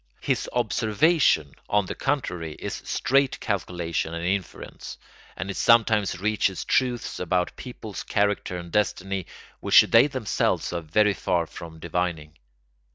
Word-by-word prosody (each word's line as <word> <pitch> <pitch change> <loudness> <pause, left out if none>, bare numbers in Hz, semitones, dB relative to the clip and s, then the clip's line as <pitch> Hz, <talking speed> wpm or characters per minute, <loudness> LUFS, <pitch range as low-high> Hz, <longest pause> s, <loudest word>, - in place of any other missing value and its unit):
His - - -1
observation, 115 - +2 0.2
on 105 -1 +2
the - - -4
contrary, 90 - -2
is - - -6
straight 135 0 +1
calculation 85 -5 -2
and 85 +1 -4
inference, 95 0 -4 0.4
and 95 +1 -4
it - - -7
sometimes 110 -5 +3
reaches 105 -2 0
truths 125 -2 0
about 90 0 0
people's 110 -5 -8
character 100 -3 0
and 85 -1 -8
destiny 95 -2 -1 0.3
which - - +7
they 115 +5 +5
themselves 130 -10 -1
are 85 - -2
very 105 +6 +2
far 85 -3 0
from 80 0 -10
divining. 80 -2 -3
95 Hz, 130 wpm, -25 LUFS, 85-110 Hz, 0.4 s, which